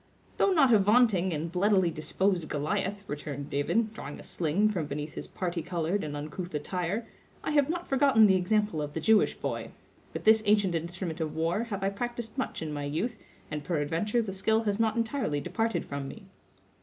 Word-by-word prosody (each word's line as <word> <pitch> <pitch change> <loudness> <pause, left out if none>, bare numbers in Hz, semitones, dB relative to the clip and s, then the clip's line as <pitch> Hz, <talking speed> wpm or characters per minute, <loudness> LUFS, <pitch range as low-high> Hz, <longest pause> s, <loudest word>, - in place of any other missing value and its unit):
"Though 395 - +3
not 280 -9 +5
a 215 - +7
vaunting 205 -3 +4
and 160 +1 -3
bloodily 190 -1 +3
disposed 175 +2 -1
Goliath," 185 +7 -2
returned 145 -1 -5
David, 215 +10 +1
drawing 145 -8 -7
a - - -10
sling 180 +6 +1
from 175 -8 -2
beneath 150 +1 -5
his - - -6
parti 175 -2 -3
colored 175 +3 -1
and 145 -1 -4
uncouth 155 +4 -6
attire, 180 +8 -2 0.4
"I - - -1
have 290 -1 +3
not 350 +1 -3
forgotten 270 -5 +5
the 190 -2 +5
example 205 -2 +1
of 145 0 -4
the - - -2
Jewish 215 +6 +4
boy. - - -4 0.4
With - - -6
this 220 0 +6
ancient 205 -3 +4
instrument 170 0 -3
of 155 -1 -3
war 165 +8 0
have 200 -4 -4
I 195 - +2
practised 240 +2 -4
much 260 -10 -3
in 155 -1 -4
my 145 -1 -3
youth, 210 +11 -2 0.3
and 150 -1 -3
peradventure 170 +9 0
the 195 -3 -5
skill 220 +4 +1
has 205 -1 0
not 220 -1 +2
entirely 230 - -1
departed 225 +10 -1
from 140 -1 -5
me." - - -9
190 Hz, 195 wpm, -29 LUFS, 155-220 Hz, 0.4 s, a